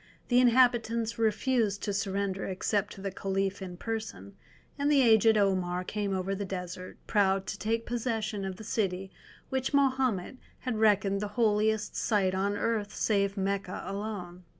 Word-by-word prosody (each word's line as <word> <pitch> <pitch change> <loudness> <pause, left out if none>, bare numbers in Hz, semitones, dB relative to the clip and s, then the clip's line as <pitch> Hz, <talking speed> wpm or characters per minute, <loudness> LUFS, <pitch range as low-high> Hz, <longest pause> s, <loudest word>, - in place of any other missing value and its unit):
The 245 0 +5
inhabitants 235 -2 +3
refused 220 -1 +1
to 205 - -1
surrender 195 -1 -1
except 200 +2 -1
to 195 - -11
the 195 0 -3
Caliph 195 +1 -2
in 180 -2 -7
person, 215 - -5 0.4
and 285 +1 +1
the 280 -3 +5
aged 220 -1 +5
Omar 185 -3 +1
came 205 +1 -3
over 190 +1 -1
the 200 +1 -3
desert, 185 -1 -6
proud 195 -2 +2
to 195 - -5
take 225 +1 -1
possession 225 -4 -2
of 190 -1 -4
the 220 - -10
city 195 -3 -2 0.4
which 265 +1 -1
Mahomet 260 -6 +1 0.2
had 250 -4 -2
reckoned 200 -2 +3
the 210 - -1
holiest 215 -1 +2
site 195 -4 +1
on 200 +2 0
earth 215 -3 -1
save 200 -1 +1
Mecca 195 -1 -2
alone. 195 -3 -5
205 Hz, 155 wpm, -29 LUFS, 195-225 Hz, 0.4 s, The